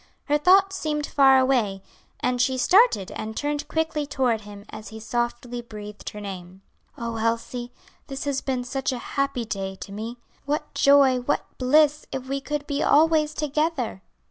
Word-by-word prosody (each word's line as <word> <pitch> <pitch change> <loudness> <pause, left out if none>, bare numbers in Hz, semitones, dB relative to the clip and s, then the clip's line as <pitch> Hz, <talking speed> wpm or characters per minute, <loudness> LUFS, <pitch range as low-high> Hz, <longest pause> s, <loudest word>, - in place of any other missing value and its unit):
Her 295 0 +2
thoughts 385 +4 +5
seemed 300 -1 -2
far 270 -2 +5
away, 235 -8 +1 0.4
and 250 -1 +1
she 260 +1 +1
started 365 - +4
and 220 0 -6
turned 295 0 -2
quickly 320 -2 -1
toward 255 -6 0
him 205 -1 -11
as 215 - -8
he 220 - -9
softly 240 +1 -3
breathed 210 -3 -8
her 210 - -9
name. 190 -2 -8 0.3
"Oh, 230 -1 -4
Elsie, 230 +2 -2 0.4
this 275 -2 -5
has 280 -2 -1
been 255 -2 -2
such 270 +2 -2
a 255 - -3 0.2
happy 275 -4 0
day 195 -2 -4
to 195 - -10
me! 225 +4 -6 0.3
What 300 +1 -2
joy, 275 -2 +5
what 250 +4 -1
bliss, 295 +3 +3
if 260 -1 -4
we 275 +1 -2
could 295 0 -3
be 285 0 -2
always 310 0 +4
together!" 300 - -1
260 Hz, 170 wpm, -24 LUFS, 225-295 Hz, 0.4 s, thoughts